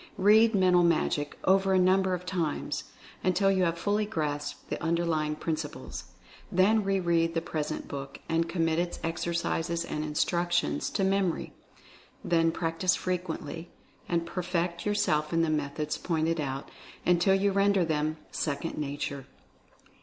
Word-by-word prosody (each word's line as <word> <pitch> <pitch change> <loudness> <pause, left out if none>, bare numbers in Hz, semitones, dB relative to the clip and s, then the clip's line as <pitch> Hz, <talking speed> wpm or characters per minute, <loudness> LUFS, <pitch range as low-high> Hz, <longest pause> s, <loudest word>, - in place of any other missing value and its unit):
Read 220 +3 +5
"Mental 180 -2 +5
Magic" 155 -3 +1
over 190 0 +3
a - - +5
number 185 0 +3
of 180 0 -8
times, 175 -5 -2 0.4
until 190 +2 +3
you 190 -1 +2
have 165 0 0
fully 205 +4 +1
grasped 150 -7 -3
the - - -3
underlying 165 -2 0
principles. 155 -1 -4 0.5
Then 205 +4 +4
re 195 0 +1
read 165 -2 +1
the - - +3
present 155 -2 -4
book, 140 -1 -6
and 165 0 0
commit 165 -2 +1
its 175 0 -2
exercises 170 0 -1
and 150 -2 -3
instructions 175 +3 0
to 195 - -1
memory. 190 -2 0 0.7
Then 165 -1 +3
practice 165 +3 0
frequently, 170 -3 -4 0.4
and 170 -1 +1
perfect 175 0 -2
your 205 - +1
self 150 -6 +1
in 165 0 +3
the 160 - +1
methods 150 0 -2
pointed 165 -1 0
out, 135 -1 -4 0.3
until 180 +2 +4
you 200 +1 +2
render 200 -2 +3
them 155 0 -1
"second 150 +1 -3
nature." 140 -1 -4
170 Hz, 145 wpm, -29 LUFS, 155-185 Hz, 0.7 s, Read